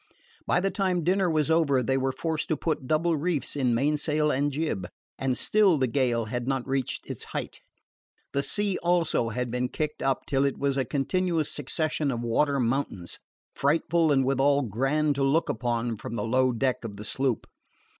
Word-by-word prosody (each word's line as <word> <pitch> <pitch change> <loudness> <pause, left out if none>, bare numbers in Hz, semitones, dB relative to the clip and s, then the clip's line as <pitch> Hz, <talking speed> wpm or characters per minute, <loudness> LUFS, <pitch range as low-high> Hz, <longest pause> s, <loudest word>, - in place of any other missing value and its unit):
By - - +3
the 195 +2 0
time 185 -3 0
dinner 185 +2 +2
was 155 -1 +1
over 140 -6 +3
they 130 +3 +1
were 135 0 +1
forced 160 +3 -2
to 155 - +1
put 155 -5 -2
double 160 +3 +2
reefs 150 -4 -1
in 125 -4 +1
mainsail 150 +3 +1
and 145 +2 +1
jib, 140 - -2 0.3
and 130 -2 0
still 205 -6 +3
the 135 - +2
gale 120 -2 +1
had 120 +2 -4
not 135 -2 -1
reached 135 -2 -2
its - - -6
height. - - -5 0.7
The 140 - +1
sea, 200 +5 0
also, 170 -9 +1
had 125 +1 -3
been 125 +1 -1
kicked 150 +1 -3
up 135 -2 0
till 135 -1 +1
it 140 -1 0
was 140 -1 0
a 135 -1 0
continuous 165 +4 0
succession 150 +1 -1
of 120 -3 -2
water 140 +4 +1
mountains, 120 -8 -2 0.3
frightful 160 +2 +2
and 135 -2 +3
withal 140 +2 +3
grand 135 +7 +1
to 140 - +1
look 145 +5 +2
upon 120 -1 -1
from 110 +2 -6
the 105 - -2
low 130 +2 +2
deck 125 +2 -1
of 105 -3 -6
the 105 - -8
sloop. 130 0 -1
140 Hz, 185 wpm, -27 LUFS, 125-155 Hz, 0.7 s, By